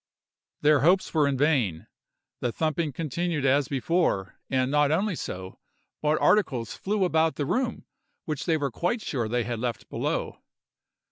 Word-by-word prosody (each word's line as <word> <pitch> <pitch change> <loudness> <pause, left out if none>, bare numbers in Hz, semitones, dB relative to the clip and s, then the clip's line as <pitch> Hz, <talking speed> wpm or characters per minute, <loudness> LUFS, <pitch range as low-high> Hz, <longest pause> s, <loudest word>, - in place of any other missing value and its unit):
Their 150 -1 +5
hopes 180 +7 +3
were 150 -3 +3
vain—the 125 - -2
thumping 160 -1 -1
continued 160 +1 -2
as 140 +1 +3
before; 140 - 0
and 130 0 +1
not 150 -1 +3
only 190 +5 +1
so, 95 -8 -6 0.4
but 150 +1 +2
articles 130 - +2
flew 205 0 -1
about 160 -2 +2
the 145 - -2
room 245 - -1 0.4
which 155 0 -4
they 160 -2 +3
were 140 -3 -2
quite 195 - -1
sure 120 -6 -2
they 120 +2 0
had 115 0 -3
left 120 -1 -4
below. - - -2
150 Hz, 145 wpm, -26 LUFS, 125-165 Hz, 0.4 s, Their